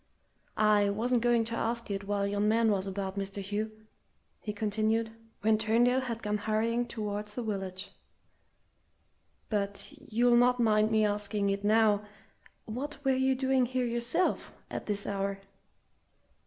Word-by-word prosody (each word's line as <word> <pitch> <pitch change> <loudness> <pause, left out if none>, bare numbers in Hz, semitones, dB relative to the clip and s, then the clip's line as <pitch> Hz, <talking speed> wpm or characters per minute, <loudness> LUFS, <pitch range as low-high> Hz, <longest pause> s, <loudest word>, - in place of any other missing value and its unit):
I 210 -1 +4
wasn't 235 +4 +1
going 240 -1 +3
to 230 +1 -4
ask 230 -1 -2
it 200 0 -3
while 200 0 0
yon 205 +1 0
man 225 0 +3
was 195 -1 0
about, 195 0 -4
Mr. 195 0 -5
Hugh," 205 +2 -3 0.7
he 210 - -4
continued, 220 +2 0 0.3
when 215 0 +3
Turndale 240 +4 +3
had 235 -3 -5
gone 210 0 -1
hurrying 225 +3 0
towards 210 -2 -4
the 245 - -3
village; 195 -2 -4 1.6
"but 200 +5 -2
you'll 245 -3 +2
not 250 +1 +4
mind 215 -2 +3
me 220 -1 +3
asking 205 -1 0
it 200 0 -3
now 210 -1 +4 0.6
what 265 +7 -5
were 270 - +4
you 265 0 +2
doing 260 -1 +2
here 255 0 -1
yourself, 240 +9 0
at - - -5
this 205 -1 0
hour?" 195 0 -2
215 Hz, 145 wpm, -30 LUFS, 205-235 Hz, 1.6 s, I